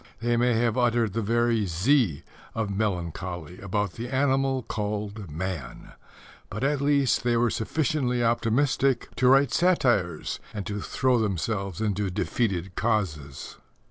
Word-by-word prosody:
They 120 Hz, 0 st, +1 dB
may 120 Hz, +1 st, +3 dB
have 120 Hz, +1 st, +1 dB
uttered 120 Hz, -4 st, +2 dB
the 115 Hz, -, -1 dB
very 115 Hz, -1 st, +1 dB
Z 90 Hz, -, +2 dB, 0.3 s
of 110 Hz, -3 st, -1 dB
melancholy 90 Hz, -4 st, -3 dB
about 100 Hz, 0 st, -1 dB
the 120 Hz, +2 st, -6 dB
animal 135 Hz, -1 st, +1 dB
called 105 Hz, -2 st, -4 dB
man; 85 Hz, -2 st, -5 dB, 0.6 s
but -, -, -5 dB
at 140 Hz, 0 st, +1 dB
least 140 Hz, -2 st, +2 dB
they 120 Hz, -1 st, +2 dB
were 120 Hz, -1 st, +2 dB
sufficiently 125 Hz, -1 st, 0 dB
optimistic 120 Hz, +3 st, +1 dB
to 130 Hz, -, +3 dB
write 135 Hz, 0 st, +5 dB
satires 120 Hz, -, +1 dB, 0.2 s
and 100 Hz, -2 st, -4 dB
to 105 Hz, 0 st, -4 dB
throw 130 Hz, +1 st, +1 dB
themselves 100 Hz, -1 st, -2 dB
into 105 Hz, -2 st, 0 dB
defeated 90 Hz, +1 st, -1 dB
causes. 85 Hz, -12 st, -2 dB
110 Hz, 135 wpm, -26 LUFS, 95-125 Hz, 0.6 s, write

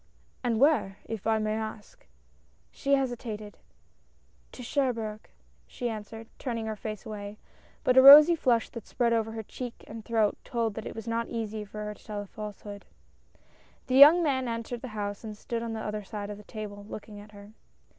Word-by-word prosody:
" -, -, -37 dB
And 230 Hz, -2 st, 0 dB
where? 275 Hz, -9 st, +3 dB
if 225 Hz, -2 st, -5 dB
I 220 Hz, 0 st, +3 dB
may 215 Hz, 0 st, -1 dB
ask." 215 Hz, -, -7 dB, 0.6 s
She 280 Hz, 0 st, +1 dB
hesitated 230 Hz, -5 st, -4 dB, 0.9 s
"To 250 Hz, -, -9 dB
Cherbourg," 230 Hz, -5 st, -2 dB, 0.4 s
she 245 Hz, -2 st, -4 dB
answered, 220 Hz, +1 st, -8 dB
turning 230 Hz, -4 st, -3 dB
her 220 Hz, -1 st, -3 dB
face 215 Hz, 0 st, -7 dB
away; 205 Hz, -1 st, -7 dB, 0.5 s
but 250 Hz, -, +3 dB
a 260 Hz, -, +9 dB
rosy 295 Hz, +5 st, +11 dB
flush 245 Hz, -7 st, +2 dB
that 230 Hz, -4 st, -9 dB
spread 235 Hz, -1 st, +1 dB
over 225 Hz, -1 st, 0 dB
her 220 Hz, 0 st, -5 dB
cheek 245 Hz, +3 st, -8 dB
and 220 Hz, 0 st, -9 dB
throat 220 Hz, -3 st, +1 dB
told 230 Hz, -3 st, -1 dB
that 220 Hz, +1 st, -6 dB
it -, -, -7 dB
was 225 Hz, 0 st, -7 dB
not 230 Hz, 0 st, -1 dB
easy 220 Hz, -2 st, -4 dB
for 210 Hz, +1 st, -7 dB
her 210 Hz, -, -4 dB
to -, -, -20 dB
tell 210 Hz, -2 st, -5 dB
a -, -, -11 dB
false 210 Hz, 0 st, -8 dB
hood. 205 Hz, -1 st, -9 dB, 1.0 s
The 255 Hz, -, -3 dB
young 300 Hz, +6 st, +9 dB
man 260 Hz, -4 st, 0 dB
entered 230 Hz, +1 st, -4 dB
the 260 Hz, -, -6 dB
house 205 Hz, 0 st, -4 dB
and 215 Hz, -2 st, -7 dB
stood 230 Hz, +2 st, -4 dB
on 230 Hz, -1 st, -4 dB
the 220 Hz, -, -4 dB
other 210 Hz, 0 st, -3 dB
side 205 Hz, +1 st, -6 dB
of 205 Hz, -, -7 dB
the -, -, -12 dB
table, 205 Hz, -2 st, -7 dB
looking 210 Hz, -1 st, -8 dB
at 210 Hz, +1 st, -14 dB
her. 205 Hz, +1 st, -13 dB
220 Hz, 195 wpm, -28 LUFS, 210-240 Hz, 1.0 s, rosy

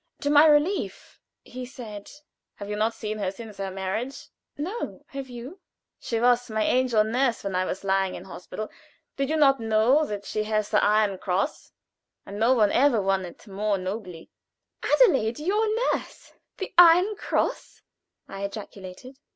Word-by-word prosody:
To 285 Hz, -, 0 dB
my 295 Hz, +2 st, +7 dB
relief 305 Hz, +6 st, +1 dB, 0.2 s
he 255 Hz, +1 st, -8 dB
said: 235 Hz, -6 st, -9 dB, 0.5 s
"Have 200 Hz, -, -8 dB
you -, -, -1 dB
not 220 Hz, +2 st, 0 dB
seen 215 Hz, 0 st, -5 dB
her 195 Hz, -2 st, -1 dB
since 210 Hz, +1 st, -10 dB
her 195 Hz, -1 st, -3 dB
marriage?" 195 Hz, +8 st, -4 dB, 0.3 s
"No; 370 Hz, +11 st, -5 dB
have 275 Hz, -1 st, -7 dB
you?" 250 Hz, +9 st, -9 dB, 0.4 s
"She 230 Hz, -, -2 dB
was 245 Hz, +1 st, +3 dB
my 220 Hz, 0 st, 0 dB
angel 250 Hz, -2 st, +3 dB
nurse 240 Hz, +2 st, 0 dB
when 195 Hz, -2 st, -3 dB
I 185 Hz, 0 st, +1 dB
was 185 Hz, -, -4 dB
lying 195 Hz, -1 st, +1 dB
in -, -, -8 dB
hospital 190 Hz, +3 st, -7 dB
at. -, -, -16 dB, 0.4 s
Did 275 Hz, 0 st, -1 dB
you 315 Hz, -, +1 dB
not 275 Hz, -3 st, +5 dB
know 225 Hz, +6 st, +3 dB
that 205 Hz, -1 st, -5 dB
she 215 Hz, -, -2 dB
has 215 Hz, -1 st, -1 dB
the -, -, +3 dB
Iron 210 Hz, -2 st, +2 dB
Cross? 190 Hz, +10 st, -2 dB, 0.5 s
And 200 Hz, +1 st, -7 dB
no 240 Hz, +4 st, +4 dB
one 210 Hz, -4 st, +3 dB
ever 260 Hz, -3 st, +4 dB
won 195 Hz, -1 st, 0 dB
it 175 Hz, -, -12 dB
more 205 Hz, 0 st, -1 dB
nobly." 185 Hz, -3 st, -6 dB, 0.5 s
"Adelaide 265 Hz, -, +3 dB
your 410 Hz, +8 st, 0 dB, 0.3 s
nurse -, -, -7 dB, 0.2 s
the 385 Hz, -, -6 dB
Iron 355 Hz, +5 st, +7 dB
Cross?" -, -, -2 dB, 0.4 s
I 195 Hz, 0 st, -7 dB
ejaculated. 200 Hz, +4 st, -8 dB
220 Hz, 165 wpm, -25 LUFS, 200-275 Hz, 0.5 s, my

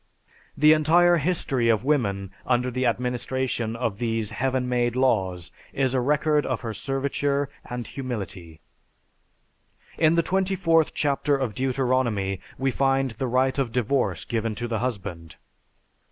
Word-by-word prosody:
The 150 Hz, +2 st, +7 dB
entire 170 Hz, +3 st, +4 dB
history 140 Hz, -7 st, 0 dB
of 110 Hz, -1 st, +2 dB
woman 100 Hz, -10 st, 0 dB, 0.2 s
under 125 Hz, 0 st, +1 dB
the 130 Hz, +1 st, 0 dB
administration 125 Hz, -1 st, -1 dB
of 115 Hz, -4 st, -2 dB
these 115 Hz, -3 st, -1 dB
"heaven 130 Hz, 0 st, -1 dB
made" 120 Hz, -1 st, 0 dB
laws 95 Hz, -9 st, 0 dB, 0.2 s
is 135 Hz, -2 st, +1 dB
a 130 Hz, -, +2 dB
record 150 Hz, +2 st, +2 dB
of 130 Hz, -, -2 dB
her 115 Hz, -2 st, -4 dB
serviture 140 Hz, +2 st, -1 dB, 0.2 s
and 120 Hz, -1 st, -5 dB
humility. 100 Hz, -, -6 dB, 1.4 s
In 160 Hz, 0 st, +4 dB
the 170 Hz, -, +3 dB
24th 185 Hz, -4 st, +2 dB
chapter 145 Hz, 0 st, +1 dB
of 130 Hz, -5 st, -2 dB
Deuteronomy 125 Hz, -7 st, 0 dB, 0.2 s
we 135 Hz, +1 st, 0 dB
find 135 Hz, 0 st, +1 dB
the 120 Hz, +4 st, -3 dB
right 130 Hz, +2 st, +1 dB
of 130 Hz, -4 st, 0 dB
divorce 120 Hz, -, 0 dB
given 115 Hz, -1 st, -2 dB
to 120 Hz, +2 st, -4 dB
the 115 Hz, -2 st, -2 dB
husband. 95 Hz, -9 st, -5 dB
125 Hz, 140 wpm, -25 LUFS, 115-140 Hz, 1.4 s, The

